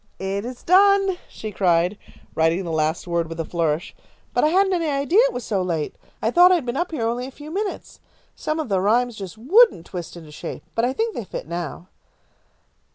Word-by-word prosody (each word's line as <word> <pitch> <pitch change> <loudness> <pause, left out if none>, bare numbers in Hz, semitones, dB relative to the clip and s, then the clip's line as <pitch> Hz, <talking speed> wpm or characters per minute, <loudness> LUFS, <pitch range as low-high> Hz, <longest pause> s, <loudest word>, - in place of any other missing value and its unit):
"It 195 +2 -3
is 250 0 -8
done," 390 0 +4
she 215 - -7
cried, 180 -1 +2 0.4
writing 165 +4 +2
the 170 - -4
last 160 +1 0
word 170 -2 -1
with 165 0 -7
a 165 - -1
flourish, 165 0 -1 0.4
"but - - +2
I - - +5
hadn't 380 +4 +3
any 335 -3 0
idea 285 +7 +2
it - - -3
was 245 - -5
so 200 -3 -1
late. 165 -4 -2 0.3
I 225 - +2
thought 355 +5 +7
I - - +6
had 325 -7 -2
been 240 0 -3
up 345 +5 -1
here 290 -9 -2
only 240 +2 -2
a - - -7
few 295 +3 -11
minutes. 400 +3 -4 0.4
Some 310 +1 -2
of 310 - -2
the 195 -4 +1
rhymes 235 +4 +2
just 195 -1 -8
wouldn't 355 - +4
twist 175 -2 -7
into 160 -3 -11
shape, 150 - -7
but 230 - +1
I 250 - +1
think 445 - -1
they 235 - -4
fit 190 - -7
now." 170 +1 -5
225 Hz, 220 wpm, -22 LUFS, -, 0.4 s, thought